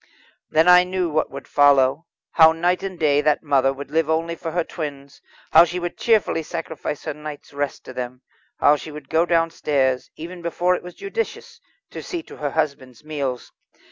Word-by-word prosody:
Then 160 +2 +3
I 180 0 +8
knew 180 -2 -2
what 155 +1 0
would 140 0 -9
follow. 145 +2 +4 0.2
How 160 -1 +7
night 175 +2 0
and 190 -2 -5
day 145 -3 +3
that 150 +1 +1
mother 135 -3 +3
would 140 +1 -8
live 160 0 +1
only 165 +1 0
for 165 - -5
her 170 +1 0
twins, 140 -4 -7 0.3
how - - +9
she 175 +1 -3
would 175 -1 -4
cheerfully 220 -7 +2
sacrifice 160 -2 -5
her - - -3
night's 150 -1 -9
rest 145 -1 -3
to 130 - -9
them; 125 0 -6 0.4
how 150 +1 +5
she 155 - -9
would 150 -2 -10
go 165 +2 +2
downstairs, 150 -6 +1
even 175 +3 -8
before 175 +2 +1
it - - -2
was 180 0 -11
judicious, 460 +3 -5 0.3
to - - -7
see 345 -3 -5
to - - -13
her 145 - -2
husband's 140 -5 -3
meals. 140 -5 -4
155 Hz, 190 wpm, -22 LUFS, 140-175 Hz, 0.4 s, how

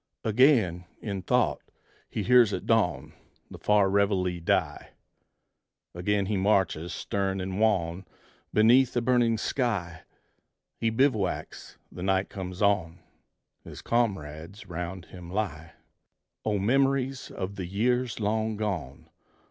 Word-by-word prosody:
Again, 110 - +3
in 100 -3 -4
thought, 90 - +1 0.5
he - - -3
hears 120 -4 +5
at - - -4
dawn 110 -7 +1 0.4
The - - -10
far 105 -2 +3
reveille 95 -3 +1
die; - - 0 1.0
Again 100 +3 0
he 105 +1 -1
marches 95 -4 +1
stern 95 +3 -2
and 95 +1 -4
wan 95 -4 +1 0.4
Beneath 120 +4 +4
a - - +2
burning 120 -2 +3
sky: 100 - -2 0.8
He 115 - +1
bivouacs; 110 -5 -1
the 90 - -9
night 95 +1 +1
comes 90 0 -5
on; 95 -5 +1 0.7
His - - -10
comrades 95 -3 -2
'round 90 +1 -6
him 90 -2 -11
lie 85 -5 -4 0.7
O 105 -1 0
memories 135 +4 +1
of 95 +1 -5
the 95 -3 -5
years 120 +5 0
long 110 +1 -1
gone! 90 -11 -4
100 Hz, 120 wpm, -27 LUFS, 90-115 Hz, 1.0 s, hears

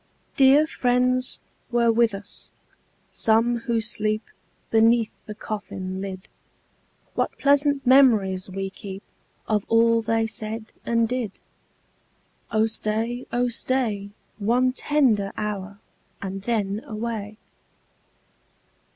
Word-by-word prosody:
Dear 275 +3 +6
friends 250 -2 0 0.3
were 235 -1 +3
with 230 -2 +3
us, 195 +1 -9 0.6
some 230 +1 +3
who 230 -1 +2
sleep 215 -1 -1 0.5
Beneath 225 0 +4 0.2
the 210 - -6
coffin 190 -3 -5
lid: 190 -1 -6 0.9
What - - -1
pleasant 285 0 +3
memories 220 -9 +4
we 195 0 -4
keep 195 0 -8 0.4
Of 210 -2 +1
all 230 0 +4
they 225 0 +1
said 220 0 -5
and 230 -1 +2
did! 240 -4 -2 1.2
Oh 220 0 +2
stay, 225 +2 -2
oh 245 +1 +1
stay, 235 -4 0 0.3
One 245 +5 +2
tender 255 -9 +2
hour, 200 -2 -4 0.4
and 195 0 -5
then 210 -2 -1
away. 215 -1 -4
225 Hz, 105 wpm, -24 LUFS, 205-240 Hz, 1.2 s, Dear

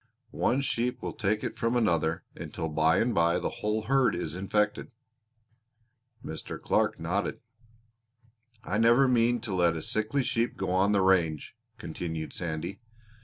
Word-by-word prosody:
One 135 - +1
sheep 125 -2 -1
will - - -3
take 105 0 -1
it - - -3
from 115 +1 0
another, 85 -8 +1
until 80 - -5
by 80 +3 +3
and 120 +1 +1
by 85 +1 +3
the - - -2
whole 105 +1 0
herd 135 +2 +2
is 80 -3 -4
infected." 105 +4 -1 1.3
Mr. 80 - -6
Clark - - +1
nodded. 90 +5 -2 1.2
"I 105 -2 -1
never 120 +4 +5
mean 120 -1 +2
to 110 -4 -4
let 85 -2 +2
a - - -4
sickly 110 +6 -1
sheep 120 -2 -1
go 95 -1 -2
on 95 +2 +3
the 100 -2 +3
range," 85 -5 +1 0.2
continued 80 -2 -5
Sandy. 85 +4 -4
100 Hz, 150 wpm, -28 LUFS, 85-115 Hz, 1.3 s, never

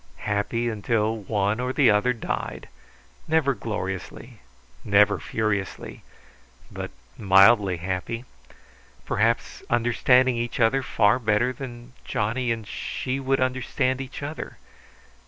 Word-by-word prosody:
Happy 105 +3 -1
until 110 0 0
one 105 0 -1
or 125 +1 -1
the 130 -4 +4
other 105 +4 +3
died; 115 -3 -4 0.6
never 155 -3 +2
gloriously, 105 +1 -6 0.4
never 105 0 +4
furiously, 105 -3 -3 0.7
but - - -5 0.3
mildly 100 -1 +5
happy; 95 +7 -4 0.8
perhaps 115 +2 0
understanding 120 +2 +3
each 120 +3 -3
other 120 +4 +3
far 115 -2 +2
better 110 +2 +1
than 120 -1 -9
Johnny 115 +4 -1
and 115 -2 -3
she 130 +1 -4
would 135 0 0
understand 130 0 0
each 135 +2 -7
other. 150 +2 -6
115 Hz, 110 wpm, -25 LUFS, 105-130 Hz, 0.8 s, mildly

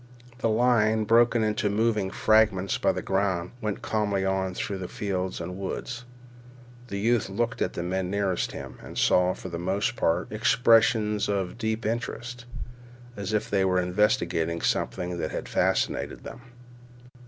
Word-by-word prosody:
The 115 - +1
line, 110 -1 +3
broken 115 +1 +4
into 105 -1 0
moving 105 -1 +1
fragments 105 -2 +2
by - - +3
the - - -4
ground, 95 -3 0
went 105 -2 -3
calmly 105 -3 0
on 95 -1 -1
through 95 -3 -3
fields 95 -2 -3
and 90 +2 -6
woods. 120 +5 -5 0.8
The 100 - -4
youth 115 +2 +1
looked 115 +4 -2
at - - 0
the 85 - -3
men 90 +1 -2
nearest 100 -2 0
him, - - -8
and - - -10
saw, 90 0 +3
for 95 - -8
the 85 -1 -5
most 95 +6 -1
part, 90 -6 0
expressions 110 -1 +3
of 100 +1 -2
deep 110 -1 -2
interest, 120 +1 -4 0.7
as 100 +1 -4
if 105 -1 0
they 100 -1 +1
were 90 -1 +2
investigating 90 -3 +1
something 90 -1 -1
that 80 - -2
had - - -5
fascinated - - 0
them. 125 - -9
100 Hz, 155 wpm, -26 LUFS, 95-110 Hz, 0.8 s, broken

